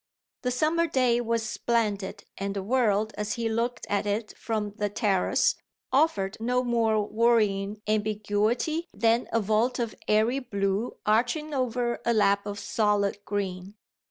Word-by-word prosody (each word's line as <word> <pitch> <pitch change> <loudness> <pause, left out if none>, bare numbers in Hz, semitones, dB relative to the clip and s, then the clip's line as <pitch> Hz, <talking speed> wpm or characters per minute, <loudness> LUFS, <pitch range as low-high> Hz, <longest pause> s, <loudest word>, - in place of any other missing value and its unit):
The 250 - 0
summer 315 +7 +1
day 250 -5 +2
was 230 -1 -1
splendid 215 -3 -1
and 200 0 -4
the 195 - -3
world, 215 -2 +1
as 210 0 -1
he 230 -1 -2
looked 230 +2 -1
at 205 0 0
it 210 +2 -2
from 215 -2 -3
the 205 -1 0
terrace, 200 -3 +2 0.4
offered 235 -9 +2
no 250 +2 +1
more 225 -3 +1
worrying 215 -2 +1
ambiguity 215 - 0
than 230 +1 +2
a 230 - +2
vault 220 +4 +1
of 235 -2 -2
airy 220 +5 +3
blue 200 -2 -2
arching 245 +8 +1
over 245 -2 -1
a 235 - +2
lap 200 -1 +3
of 205 0 -4
solid 205 -2 0
green. 195 -1 -4
220 Hz, 145 wpm, -27 LUFS, 205-240 Hz, 0.4 s, airy